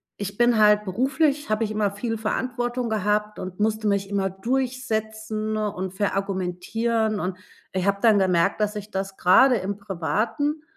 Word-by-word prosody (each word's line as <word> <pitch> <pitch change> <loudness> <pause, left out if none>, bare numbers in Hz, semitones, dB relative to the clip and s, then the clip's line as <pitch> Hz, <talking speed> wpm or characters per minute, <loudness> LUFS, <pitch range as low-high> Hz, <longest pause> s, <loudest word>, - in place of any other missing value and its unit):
ich 200 0 -6
bin 240 -2 +4
halt 210 0 +5
beruflich 275 - 0
habe 215 +1 +1
ich 215 - -2
immer 210 -1 +1
viel 225 +2 -3
Verantwortung 245 +2 -2
gehabt 210 0 0
und 185 +1 -7
musste 215 0 0
mich 200 -1 0
immer 195 -1 0
durchsetzen 220 -1 -2
und 190 -3 -3
verargumentieren. 205 +3 -1
Und 185 0 -3 0.3
ich 185 0 -1
habe 200 0 +2
dann 220 -3 +5
gemerkt, 185 +2 +2
dass 210 0 0
ich 210 0 -7
das 195 0 -4
gerade 250 +8 +6
im 200 0 -3
Privaten 215 - -1
210 Hz, 155 wpm, -24 LUFS, 195-230 Hz, 0.3 s, gerade